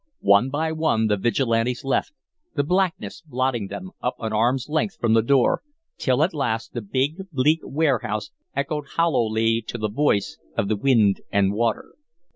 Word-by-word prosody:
One 100 +6 +5
by 160 +3 -1
one 155 -8 +1
the 105 -1 +2
Vigilantes 115 +3 0
left, 135 - 0 0.4
the 145 - +2
blackness 180 +1 -1
blotting 130 - -1
them 185 - -7
up 125 - -1
an 110 -1 -4
arm's 120 +4 +1
length 160 +4 -1
from 115 -2 +2
the 115 - +5
door, 130 +2 +3 0.4
till 130 +2 +2
at 170 - 0
last 120 -7 -2
the 120 - -3
big, 140 - -2
bleak 150 +3 +2
warehouse 135 -8 -1 0.2
echoed 145 +1 -2
hollowly 115 -8 +2
to - - -4
the 110 -1 -2
voice 115 -5 0 0.2
of 100 - 0
the 110 - +2
wind 110 -4 +3
and 100 -1 +2
water. 115 +1 -1
125 Hz, 165 wpm, -23 LUFS, 110-150 Hz, 0.4 s, One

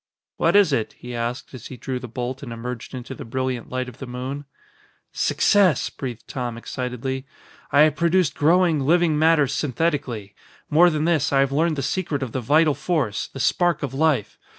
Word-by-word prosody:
"What - - +2
is 200 -8 +5
it?" 115 -5 -1
he 125 0 -8
asked, 120 +3 -4
as 125 -3 -8
he 130 - -9
drew 130 +2 -4
the 125 - -7
bolt 125 +3 -5
and 130 -4 -7
emerged 115 +2 -6
into 125 +1 -7
the - - -8
brilliant 130 0 -3
light 130 0 -3
of 125 +2 -11
the 135 - -7
moon. 130 +4 -5 0.7
"Success!" 195 -9 +3
breathed 125 -4 -7
Tom 125 -3 -4
excitedly. 130 +2 -4 0.4
"I 145 - +5
have 155 -1 +4
produced 170 -1 +2
growing, 165 +1 +3
living 160 +2 +2
matter 160 -2 +5
synthetically. 135 -6 -2 0.4
More 170 +4 +6
than 155 -1 -1
this, 165 -5 +2
I 135 -1 +4
have 135 0 +1
learned 160 +3 +1
the 140 - -3
secret 145 -1 -1
of 125 - -5
the 130 - -3
vital 150 +5 +4
force 140 - -1
the 135 - -10
spark 175 +6 +1
of 135 -2 -3
life. 135 -8 +1
135 Hz, 190 wpm, -23 LUFS, 125-155 Hz, 0.7 s, More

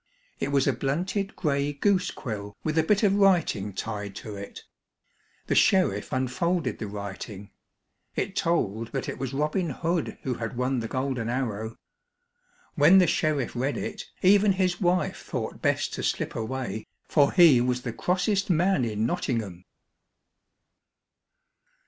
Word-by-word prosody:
It 140 - -2
was 140 -1 +3
a 140 - +2
blunted 180 - -2
gray 145 -3 0
goose 185 +5 +2
quill 105 -5 -6
with 155 -1 -1
a 160 - +5
bit 210 +6 +2
of 200 -2 +4
writing 175 - +2
tied 100 0 -5
to 105 +1 -7
it. 100 0 -9 0.8
The - - 0
sheriff 175 - +3
unfolded 130 - -1
the 110 - -4
writing. 100 0 -7 0.6
It 190 - -2
told 115 - 0
that 135 - -2
it - - -5
was 135 -1 -3
Robin 150 +5 0
Hood 165 +4 -2
who 130 - -1
had 115 0 -5
won 125 +1 0
the 115 - -3
golden 130 -2 -2
arrow. 115 -3 -2 1.0
When 165 +4 +6
the 185 - +6
sheriff 155 -6 0
read 135 +4 -1
it, - - -5 0.2
even 200 +1 +5
his 185 -1 0
wife 180 0 +1
thought - - -5
best - - 0
to - - -4
slip - - -1
away, 115 -1 -4 0.2
for 145 -3 +4
he 165 -9 +7
was 125 0 0
the 115 - -4
crossest 185 - 0
man 175 -3 +3
in 110 -1 -1
Nottingham. 115 - -2
135 Hz, 150 wpm, -26 LUFS, 115-175 Hz, 1.0 s, he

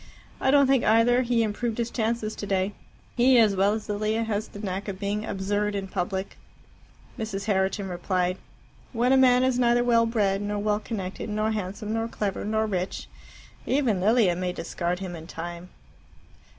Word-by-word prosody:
I 265 - +1
don't 280 0 +6
think, 265 -2 +3
either, 230 +3 +4
he 240 -2 +1
improved 220 +1 -2
his 235 -1 -2
chances 220 -2 -1
today. 195 0 -1 0.4
He, 255 +1 +5
as 215 -4 +5
well 195 +2 +3
as 215 -1 -4
Lilia, 215 +2 -1
has 220 -1 -2
the - - -12
knack 195 -1 -4
of 195 -2 -4
being 205 +1 -2
absurd 205 +1 -1
in 195 -1 -3
public." 190 0 -3 0.8
Mrs. 200 -3 -4
Herriton 195 -1 0
replied, 180 0 -1 0.5
"When 245 +2 +2
a - - +6
man 255 -1 +5
is 260 -1 +1
neither 240 0 +3
well 230 -1 +3
bred, 205 -4 +1
nor 205 0 -2
well 210 0 0
connected, 200 -2 -5
nor 215 +1 0
handsome, 210 +1 -4
nor 225 0 -1
clever, 205 -4 -3
nor 220 +1 0
rich, 185 -3 -3 0.6
even 250 -9 +1
Lilia 210 -3 +3
may 180 0 -2
discard 175 +1 -3
him 185 -2 -6
in 160 0 -10
time." 175 +2 -7
210 Hz, 175 wpm, -26 LUFS, 190-230 Hz, 0.8 s, don't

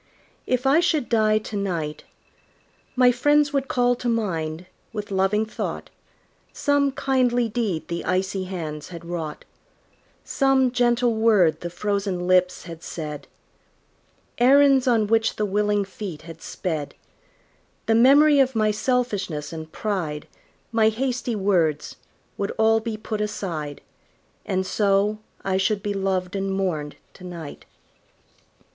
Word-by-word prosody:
If 255 +1 0
I 275 +4 +5
should 320 -6 +1
die 215 -2 +3
to 215 0 -5
night, 170 -7 -3 0.9
My 250 -1 +5
friends 290 +4 +2
would 275 -1 0
call 245 -1 +2
to 245 - -2
mind, 170 -7 -2 0.3
with 210 -2 -6
loving 195 +3 +1
thought, 220 - -5 0.6
Some 285 -1 +1
kindly 250 -3 +1
deed 205 -8 -2
the 170 0 -4
icy 185 +1 -1
hands 160 -5 -5
had 170 -2 -10
wrought; 165 -3 -5 0.8
Some 270 -2 +2
gentle 240 -1 +2
word 205 -8 +3
the 175 - -4
frozen 195 0 -2
lips 180 0 +2
had 165 -2 -9
said; 150 -4 -6 1.1
Errands 270 +1 +5
on 230 -3 +3
which 225 +1 +1
the 210 - -1
willing 205 0 +1
feet 190 -5 -7
had 165 0 -11
sped; 155 -5 -4 0.9
The 225 - +2
memory 280 +5 +6
of 265 -2 +3
my 215 -1 +2
selfishness 210 - -1
and 160 -1 -7
pride, 170 -9 -3 0.4
My 220 -1 +4
hasty 245 +1 -2
words, 175 -7 0 0.4
would 200 - -1
all 225 0 +4
be 220 -1 -4
put 215 0 -4
aside, 165 -9 -4 0.7
And 190 0 0
so 205 +1 +1 0.2
I 190 -1 0
should 200 +1 0
be 205 -1 -1
loved 190 -1 -1
and 195 0 -1
mourned 175 -7 -2 0.2
to 185 - -15
night. 170 -5 -8
205 Hz, 135 wpm, -23 LUFS, 180-240 Hz, 1.1 s, memory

